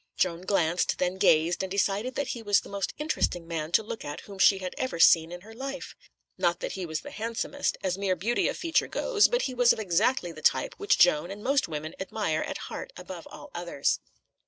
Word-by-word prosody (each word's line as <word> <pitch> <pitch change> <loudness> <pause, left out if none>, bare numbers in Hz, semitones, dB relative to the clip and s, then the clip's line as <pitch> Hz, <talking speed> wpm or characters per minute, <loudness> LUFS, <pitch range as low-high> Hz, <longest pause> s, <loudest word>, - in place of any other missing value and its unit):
Joan 175 -2 +1
glanced, 180 -3 +1
then 180 +1 -1
gazed, 165 +2 +4
and 190 - -3
decided 200 +5 0
that 285 - -2
he 235 - -4
was 205 -3 +3
the - - -12
most 200 -2 -2
interesting 235 - -1
man 160 -1 -3
to 220 - +4
look 225 +1 -6
at 145 - -6
whom 200 -2 -11
she 195 - +6
had 185 -1 -5
ever 260 -9 -3
seen 165 0 +6
in 175 0 -7
her 220 +3 -13
life. 270 +3 -6 0.5
Not 175 -1 +1
that - - -4
he 185 -2 -5
was 155 -1 -3
the - - -9
handsomest, 230 +6 -2
as 185 0 -1
mere 195 -2 +1
beauty 225 +8 0
of - - -2
feature 335 -1 +1
goes, 445 -4 +3
but 485 0 0
he 260 - -2
was 245 -1 +5
of - - -7
exactly 200 +1 +1
the 155 -1 -11
type - - +2
which 405 - +2
Joan 170 -1 +4
and 205 +2 -8
most 275 +1 +2
women 155 0 -5
admire 190 -4 -1
at - - -4
heart - - -6
above - - -8
all - - -11
others. - - -1
195 Hz, 225 wpm, -28 LUFS, 175-235 Hz, 0.5 s, she